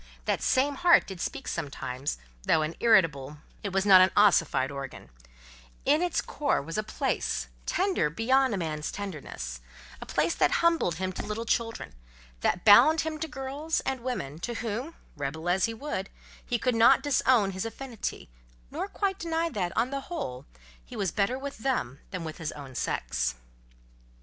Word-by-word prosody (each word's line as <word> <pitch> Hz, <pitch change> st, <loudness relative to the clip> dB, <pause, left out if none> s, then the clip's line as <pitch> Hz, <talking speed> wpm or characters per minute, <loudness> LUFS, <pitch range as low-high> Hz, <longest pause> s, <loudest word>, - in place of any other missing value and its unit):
That -, -, 0 dB
same 275 Hz, +2 st, +2 dB
heart 350 Hz, -1 st, +6 dB
did 190 Hz, -3 st, -8 dB
speak 135 Hz, -, -4 dB
sometimes; 135 Hz, -1 st, -3 dB, 0.2 s
though 155 Hz, -, +2 dB
an 155 Hz, +2 st, -3 dB
irritable, 150 Hz, -, +3 dB, 0.2 s
it 200 Hz, -, -4 dB
was 195 Hz, +1 st, +1 dB
not 190 Hz, -2 st, +9 dB
an 185 Hz, -, +6 dB
ossified 165 Hz, -9 st, +4 dB
organ: 135 Hz, -, -8 dB, 0.7 s
in 295 Hz, +4 st, +4 dB
its 355 Hz, -2 st, +1 dB
core 290 Hz, -1 st, 0 dB
was 165 Hz, +4 st, -6 dB
a 215 Hz, -, +1 dB
place, 215 Hz, -, -2 dB, 0.2 s
tender 370 Hz, -, +1 dB
beyond 255 Hz, -, +2 dB
a -, -, -2 dB
man's 155 Hz, -3 st, -3 dB
tenderness; 140 Hz, -, -6 dB, 0.4 s
a -, -, -7 dB
place 155 Hz, +2 st, +1 dB
that -, -, +2 dB
humbled 330 Hz, -, +3 dB
him 185 Hz, +2 st, -2 dB
to -, -, -5 dB
little 215 Hz, +2 st, -3 dB
children, 225 Hz, -, -2 dB, 0.5 s
that 175 Hz, -, 0 dB
bound 310 Hz, +10 st, +8 dB
him 315 Hz, -1 st, -4 dB
to 320 Hz, -, -2 dB
girls 285 Hz, +2 st, -3 dB
and 265 Hz, -1 st, -2 dB
women 160 Hz, -, -4 dB
to 235 Hz, +7 st, -4 dB
whom, 240 Hz, +8 st, -4 dB, 0.2 s
rebel 150 Hz, +3 st, -4 dB
as 180 Hz, +2 st, +3 dB
he 230 Hz, -, -3 dB
would, 220 Hz, -7 st, -4 dB, 0.3 s
he 245 Hz, -, -1 dB
could 250 Hz, +2 st, 0 dB
not 230 Hz, +4 st, +5 dB
disown 255 Hz, -7 st, +3 dB
his 190 Hz, 0 st, -4 dB
affinity, 230 Hz, 0 st, -5 dB, 0.4 s
nor -, -, -3 dB
quite 395 Hz, -1 st, -2 dB
deny 330 Hz, 0 st, -1 dB
that, 180 Hz, -, -2 dB
on 240 Hz, +3 st, +1 dB
the 275 Hz, 0 st, -2 dB
whole, 205 Hz, -, -5 dB, 0.4 s
he -, -, -11 dB
was 190 Hz, -4 st, -1 dB
better 210 Hz, +5 st, 0 dB
with 280 Hz, -1 st, -7 dB
them 185 Hz, -, -1 dB
than 185 Hz, -3 st, -5 dB
with 160 Hz, +1 st, -7 dB
his 160 Hz, -2 st, -3 dB
own 140 Hz, -3 st, -10 dB
sex. -, -, -1 dB
205 Hz, 175 wpm, -28 LUFS, -, 0.7 s, not